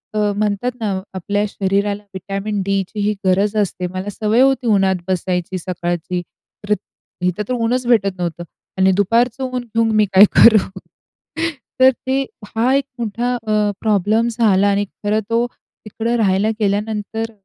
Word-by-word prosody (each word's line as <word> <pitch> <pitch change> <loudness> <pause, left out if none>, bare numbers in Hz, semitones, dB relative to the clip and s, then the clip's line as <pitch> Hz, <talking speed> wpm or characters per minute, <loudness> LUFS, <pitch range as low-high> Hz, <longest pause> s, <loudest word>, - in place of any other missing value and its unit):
अ, 210 -1 +1
म्हणतात 210 +3 0
ना, 215 -3 -1 0.2
आपल्या 205 +3 -1
शरीराला 200 +1 -1
व्हिटॅमिन 195 +2 -3
डीचीही 200 +2 -1
गरज 195 +3 +2
असते. 185 -3 -1
मला 185 +2 -4
सवय 215 +3 +1
होती 265 -2 +3
उन्हात 195 -3 +3
बसायची 185 0 -1
सकाळची, 175 0 -3 0.5
तर 210 - +3 0.5
इथं 180 +3 0
तर - - 0
ऊनच 245 +1 0
भेटत 215 -5 +3
नव्हतं 175 -1 -3 0.3
आणि 190 0 +4
दुपारचं 230 +6 +1
ऊन 255 -1 -3
घेऊन 230 -1 0
मी 215 0 +4
काय 190 +2 +9
करू. 210 -4 +5 1.0
तर 260 0 +8 0.2
ते 265 +1 +1 0.3
हा 240 +4 +2
एक 275 -1 +1
मोठा 235 +2 -1
अ, 215 -3 0
प्रॉब्लेम 215 +2 +2
झाला 210 -4 +3
आणि 200 0 +1 0.2
खरं 210 +1 +1
तो 230 +1 +2
तिकडं 230 0 -6
राहायला 200 -1 +2
गेल्यानंतर 215 +2 -2
210 Hz, 145 wpm, -19 LUFS, 195-230 Hz, 1.0 s, काय